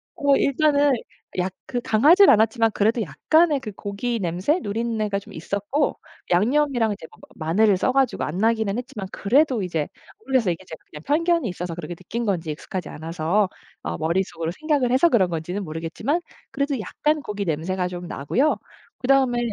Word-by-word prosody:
어 285 -1 +3
일단은 290 +1 +3 0.5
약 185 +1 0 0.2
그 245 - -2
강하지는 310 - +6
않았지만 225 +1 +3
그래도 220 +3 +2
약간의 300 - +2
그 230 -5 -7
고기 205 +5 -3
냄새 185 - 0
누린내가 215 -2 -1
좀 200 - -14
있었고 205 - -2 0.3
양념이랑 240 +3 +2
이제 200 - -10
뭐 - - -18
뭐 - - -15
마늘을 195 +6 +3
써 255 - +1
가지고 270 0 +1
안 155 - -3
나기는 220 -1 +1
했지만 245 -6 -6
그래도 255 +2 +2
이제 165 -5 -2 0.3
모르겠어요, 260 - +1
이게 170 - -11
제가 160 - -9
그냥 150 - -10
편견이 335 0 +1
있어서 180 -1 -5
그렇게 175 0 -6
느낀 230 +7 -4
건지 175 -6 -1
익숙하지 180 +4 -5
않아서 165 +5 0 0.3
어 - - -3
머릿속으로 165 0 -1
생각을 290 -6 +1
해서 275 +7 +5
그런 195 - +3
건지는 175 +4 -3
모르겠지만 165 - -2 0.3
그래도 280 -1 -1
약간 300 +8 -1
고기 205 -5 -4
냄새가 180 +3 -1
좀 175 -1 -7
나고요. 245 - +1 0.4
그다음에 260 -1 +3
215 Hz, 400 characters per minute, -23 LUFS, 180-270 Hz, 0.5 s, 강하지는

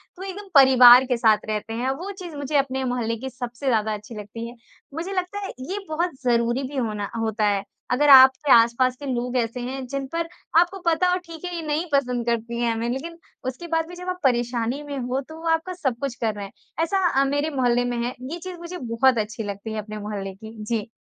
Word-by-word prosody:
तो 375 - -9
एकदम 390 +1 -7
परिवार 255 -2 +9
के 250 -2 0
साथ 220 -2 +3
रहते 215 +1 -3
हैं, 245 +3 -1
वो 350 +9 -4
चीज़ 350 -4 -8
मुझे 285 +1 -4
अपने 265 -1 0
मोहल्ले 245 -3 -1
की 265 +3 -6
सबसे 245 +1 -7
ज़्यादा 220 -3 +2
अच्छी 210 +2 -8
लगती 210 +3 -7
है। 240 - -12 0.4
मुझे 335 +5 -4
लगता 370 +2 -2
है - - -5 0.2
ये 400 +2 -2
बहुत 340 +3 0
ज़रूरी 240 +1 +1
भी 275 +2 -5
होना 210 -5 -2
होता 220 -1 0
है, 200 -1 +1 0.3
अगर 290 +3 +3
आपके 265 +1 +8
आस-पास 235 +2 +4
के 290 - -7
लोग 245 +1 -2
ऐसे 235 +1 -1
हैं, 260 +2 -4
जिन 275 +1 -3
पर 335 0 -1 0.3
आपको 360 +3 +1
पता 335 +2 +2
हो 360 - +2
ठीक 335 +1 -9
है, 355 - -4
ये 335 - -3
नहीं 300 +3 0
पसंद 250 -4 +1
करती 235 0 -2
हैं 235 -1 +2
हमें, 230 +1 -2
लेकिन 325 +7 -4 0.3
उसके 260 +7 -5
बाद 325 0 0
भी 355 - -9
जब 360 +1 -6
आप 365 - -3
परेशानी 240 +1 0
में 285 -1 -6
हो, 255 +1 -2
तो 315 +4 -12
वो 330 - -4
आपका 325 +3 0
सब 265 -9 -2
कुछ 275 -3 -2
कर 225 -2 +1
रहे 205 -1 -5
हैं, 195 - -11 0.3
ऐसा 380 +3 +1 0.2
अ, - - +3
मेरे 285 +3 0
मोहल्ले 245 -2 +2
में 245 -1 -2
है। 245 - -3 0.2
ये 345 - -4
चीज़ 365 0 -7
मुझे 345 +1 -7
बहुत 240 +2 +2
अच्छी 220 +1 -3
लगती 205 +2 -5
है 215 - -3
अपने 215 +1 -8
मोहल्ले 205 -2 -5
की, 220 +3 -11
जी। 215 -1 -2
255 Hz, 235 wpm, -24 LUFS, 230-315 Hz, 0.4 s, परिवार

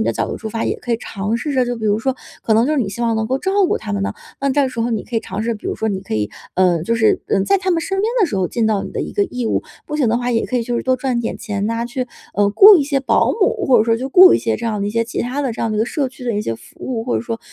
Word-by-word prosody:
你 - - +1
的 115 - +1
角 - - -1
度 - - -4
出 220 - -6
发， 225 +1 -3
也 - - -1
可 240 - -3
以 230 - +2
尝 210 0 -3
试 295 +5 -3
着， 255 -1 +3
就 245 0 -3
比 220 - -6
如 210 0 +2
说， 265 +3 -1 0.3
可 225 - +1
能 225 +3 +4
就 305 - +1
是 300 - +1
你 230 -7 0
希 200 +4 -7
望 230 -1 +1
能 220 0 -1
够 260 +3 0
照 380 +6 -2
顾 - - 0
他 - - -6
们 100 -1 -1
呐， 100 0 -1 0.3
那 275 0 +1
这 275 -1 +2
时 245 -2 -5
候 235 +1 0
你 225 - -2
可 245 - -9
以 225 - +1
尝 195 +3 -5
试， 230 +1 -1
比 210 - -9
如 - - -1
说 220 - -1
你 195 -3 -2
可 190 - -5
以， 105 -1 0 0.3
呃， 180 -3 +2
就 230 +6 0
是 220 - +3 0.3
在 395 - +4
他 375 0 -1
们 335 - +2
身 385 +3 -3
边 440 +3 +1
的 390 - +4
时 210 - -3
候 185 -2 0
尽 230 -2 0
到 215 -3 +1
你 - - -6
的 - - -3
一 - - -5
个 410 - +1
义 250 -9 -4
务。 - - 0 0.2
不 300 - -3
行 265 -7 +2
的 230 - +2
话， 245 0 -2
也 230 -2 +1
可 255 - -2
以 235 - +1
就 240 +1 -2
是 - - -2
多 255 0 +1
赚 250 -2 -1
点 230 - -3
钱 205 -3 -3
呐， 230 +1 -1
去， 255 +1 -3 0.3
呃， 205 0 +3
雇 400 - +9
一 295 - +2
些 280 -1 0
保 265 - +2
姆， 435 0 +1
或 255 -5 +5
者 215 - +3
说 230 0 +2
去 250 - -5
雇 365 +6 +8
一 - - +3
些 225 - -1
这 235 - -7
样 215 -2 -2
的 200 - -1
一 - - -2
些 230 +2 0
其 230 - -4
他 255 +4 -3
的 260 -4 -1
这 220 - -7
样 225 - 0
的 215 - -2
一 - - -1
个 220 - +3
社 280 -5 -1
区 255 -1 -12
的 235 -3 -1
一 210 - -1
些 115 - -2
服 - - -17
务， 230 -3 -3
或 245 - 0
者 - - -1
说 230 -1 -4
235 Hz, 395 characters per minute, -19 LUFS, 215-265 Hz, 0.3 s, 雇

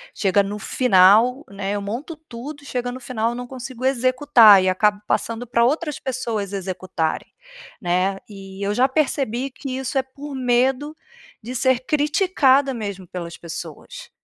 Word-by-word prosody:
chega 200 0 +2
no 205 +1 -5
final, 230 +5 +4
né, 200 0 -4
eu 205 - -2
monto 240 +11 -5
tudo 290 0 -9
e - - -15
chega 245 -2 -3
no 255 - -7
final 230 -3 -1
eu - - -6
não 245 0 -6
consigo 255 -1 -8
executar, 255 -5 +6
e 185 - +2
acabo 205 +2 +1
passando 230 +2 -1
pra 235 0 +2
outras 300 +2 -1
pessoas 230 -6 -3
executarem, 185 -4 -3 0.5
né. 185 +2 0
E 195 -1 -9
eu 205 - 0
já 255 +4 +3
percebi 270 -3 -1
que 260 -1 -6
isso 265 +1 -3
é 265 - +2
por 280 +2 -10
medo 260 +4 +1 0.5
de 245 +3 -6
ser 260 0 +2
criticada 290 -3 +2
mesmo 200 -5 -6
pelas 170 -1 -7
pessoas. 475 - -9
245 Hz, 160 wpm, -21 LUFS, 200-265 Hz, 0.5 s, executar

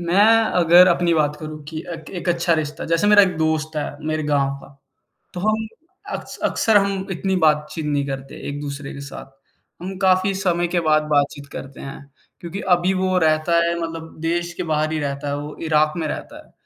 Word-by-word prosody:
मैं 175 +4 +3 0.4
अगर 175 +2 +7
अपनी 175 -1 +2
बात 150 -1 +1
करूँ 155 -1 -7
कि 160 0 -5 0.2
एक 160 -2 -10
एक 170 - -5
अच्छा 170 0 +2
रिश्ता, 155 -1 -3
जैसे 165 +4 +1
मेरा 205 0 +7
एक 180 -3 +1
दोस्त 155 0 0
है, 145 -1 -3
मेरे 155 0 -1
गाँव 140 -2 +1
का, - - -13 0.7
तो 180 - -4
हम 215 +2 0 0.5
अक्स - - -10
अक़्सर 220 -2 +2
हम 195 -1 -1
इतनी 190 +1 -1
बातचीत 150 +1 +1
नहीं 145 -1 0
करते 135 -1 -6
एक-दूसरे 145 -1 -5
के 140 - -8
साथ। 135 -1 -10 0.5
हम 190 +1 -5
काफ़ी 190 0 +3
समय 175 -2 0
के 175 0 0
बाद 155 -2 +3
बातचीत 145 -1 +1
करते 135 0 -8
हैं 135 - -7 0.4
क्योंकि 175 +3 -6
अभी 175 +2 +1
वो 185 0 0
रहता 155 0 +2
है 170 0 0
मतलब 165 -1 -6
देश 170 +1 -1
के 180 - -4
बाहर 155 +1 0
ही 160 - -1
रहता 140 0 -3
है, 145 - -1
वो 150 +1 -7
इराक़ 155 +1 +2
में 160 - -1
रहता - - -6
है - - -27
160 Hz, 200 wpm, -21 LUFS, 150-180 Hz, 0.7 s, अगर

